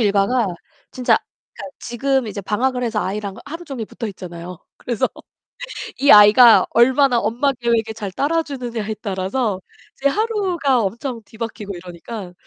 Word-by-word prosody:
일과가 210 +2 +2 0.4
진짜 250 -1 +2 0.4
그니까 280 - -9
지금 265 +1 -1
이제 205 -1 -5
방학을 250 +6 -1
해서 220 -2 -1
아이랑 200 0 -4
하루 330 +4 -7
종일 260 -8 -6
붙어있잖아요. 180 -6 -7 0.2
그래서 240 -4 -1 0.9
이 285 - +4
아이가 210 +3 +8
얼마나 255 +2 +4
엄마 235 +6 +1
계획에 235 -3 0
잘 205 -3 -6
따라주느냐에 255 - -2
따라서 195 +1 -2 0.4
이제 280 - +1
하루가 365 - +1
엄청 230 +4 -4
뒤바뀌고 220 -3 -6
이러니까 180 +3 -8
230 Hz, 335 characters per minute, -20 LUFS, 205-265 Hz, 0.9 s, 아이가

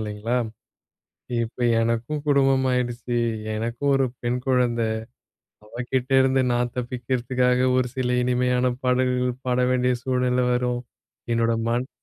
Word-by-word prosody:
இல்லேங்களா! 110 +3 -2 1.1
இப்ப 115 +2 -6 0.2
எனக்கும் 115 +6 -1
குடும்பம் 135 -2 +3
ஆகிடுச்சு. 120 -1 -1 0.4
எனக்கும் 120 +6 -1
ஒரு 135 -1 +2 0.2
பெண் 120 +1 0
குழந்தை. 120 -3 +2 0.8
அவகிட்ட 125 +3 -3
இருந்து 130 0 +3
நான் 120 0 -1
தப்பிக்கிறதுக்காக 125 +1 0
ஒரு 130 -1 +2
சில 125 -1 0
இனிமையான 125 0 +1
பாடல்கள் 125 0 +1
பாட 125 0 +1
வேண்டிய 125 0 +2
சூழ்நிலை 125 -1 +1
வரும். 125 0 0 0.5
என்னோட 115 0 +2 0.2
மண் 120 +2 -1
125 Hz, 115 wpm, -24 LUFS, 120-130 Hz, 1.1 s, குடும்பம்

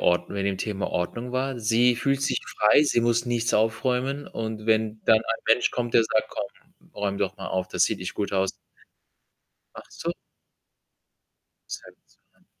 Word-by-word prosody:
Ord 90 0 +2
wegen 100 -1 -2
dem 95 -1 -1
Thema 100 -2 -2
Ordnung 115 +8 -3
war? 130 0 -1
Sie 120 +3 +4
fühlt 135 +2 0
sich - - +1 0.2
frei, 105 +7 +6
sie 135 -5 +2
muss 120 0 +2
nichts 115 -1 0
aufräumen, 125 +5 0
und 110 -1 -5
wenn 110 -1 +1
dann 110 - +6
ein 135 +4 -3
Mensch 115 +2 +4
kommt, 120 -1 -3
der 115 - +7
sagt: 110 0 0
„Komm, 170 +10 -9
räum 100 -1 -2
doch 100 0 -1
mal 95 - -6
auf, 95 0 -2
das - - +3
sieht - - -1
nicht 90 - -5
gut 100 - -2
aus“ 95 0 +1 1.2
Ach - - -8
so. - - -4 1.6
Seltsam. - - -13
115 Hz, 165 wpm, -25 LUFS, 100-125 Hz, 1.6 s, der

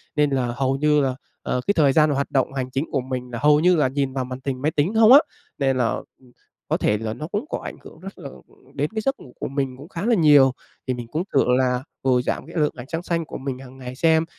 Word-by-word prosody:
nên 150 -1 +3
là 135 -2 0
hầu 135 +1 0
như 150 +1 +3
là, 130 -2 0 0.3
ờ, 125 - -2
cái 200 - +4
thời 145 -7 +3
gian 155 +1 +4
hoạt 140 -1 -1
động 135 0 +1
hành 130 -2 -3
chính 135 +4 -1
của 135 - 0
mình 125 -1 -5
là 120 - -4
hầu 150 0 +5
như 180 +3 +4
là 150 -5 +3
nhìn 135 0 -2
vào 130 -1 -2
màn 130 0 -6
hình 130 -2 -3
máy 150 +3 +1
tính 150 +7 0
không 220 +1 +6
á, 280 - +11 0.4
nên 135 -2 +1
là, 125 -2 +2 0.3
ừm, 125 -2 -21 0.4
có - - +1
thể 105 - +1
là 110 0 -4
nó 150 +6 -6
cũng 205 - -3
có - - -3
ảnh - - -6
hưởng - - -13
rất 195 +3 -10
là 140 - -7
ừm, 135 - -19
đến 145 +2 -1
cái 220 - 0
giấc 270 +5 -1
ngủ 125 - -14
của - - -3
mình 135 -2 -3
cũng 145 +5 -12
khá 185 +1 -5
là 235 0 +4
nhiều. 145 -7 +6 0.4
Thì 130 - +1
mình 120 -1 -6
cũng 155 +8 -2
thử 135 - +4
là 125 -1 +1 0.2
vừa 130 -2 +3
giảm - - -3
cái 165 - -12
lượng 150 -2 +2
ánh 120 - -8
sáng 165 +1 -3
xanh 165 -2 -1
của - - -7
mình 130 -1 -5
hằng 130 0 -12
ngày 125 -1 -8
xem, 160 +3 +3
140 Hz, 285 wpm, -23 LUFS, 130-155 Hz, 0.4 s, á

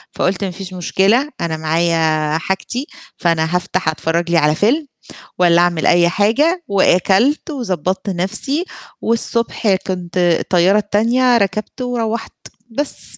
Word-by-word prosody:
فقلت 185 +2 0
ما 190 - -2
فيش 185 0 -8
مشكلة 200 - +1
أنا 160 -2 -2
معايا 160 -1 +1
حاجتي 190 - -3 0.3
فأنا 165 0 0
هافتح 180 +1 -1
أتفرج 165 +2 -2
لي 170 - +4
على 150 -1 +3
فيلم 275 - +1 0.5
والّا 175 -1 +5
أعمل 175 -2 +1
أي 175 0 +4
حاجة 290 - +1
وأكلت 200 - +2
وضبّطت 190 - -3
نفسي 195 - -2 0.4
والصبح 230 -3 0
كنت 185 -1 -5 0.2
الطيارة 185 +3 +2
التانية 235 +4 +2
ركبته 215 +4 -2
وروّحت 230 -2 -3 0.4
بس 280 +5 -4
190 Hz, 125 wpm, -17 LUFS, 170-230 Hz, 0.5 s, والّا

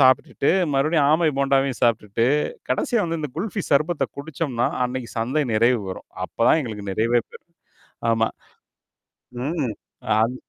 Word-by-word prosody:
சாப்பிட்டுட்டு, 130 +1 +3 0.2
மறுபடியும் 145 +2 +3
ஆமை 160 0 +3
போண்டாவையும் 135 -2 +1
சாப்புட்டுட்டு, 115 -1 +2 0.4
கடைசியா 240 -7 +1
வந்து 165 -1 -2
இந்த 150 - -4
குல்ஃபி 200 +2 -2
சர்பத்த 145 -1 +2
குடிச்சோம்னா, 140 -4 -2 0.2
அன்னைக்கு 125 -1 -5
சந்தை 130 +7 0
நிறைவு 115 +2 +3
வரும். - - -9 0.2
அப்பதான் 160 - +3
எங்களுக்கு 105 -4 -6
நிறைவே 115 +3 +2
பெரும். - - -16 0.6
ஆமா. 115 0 +2 1.2
ம். 140 -6 -1 0.5
அது 115 +3 +1
135 Hz, 125 wpm, -23 LUFS, 115-155 Hz, 1.2 s, சாப்பிட்டுட்டு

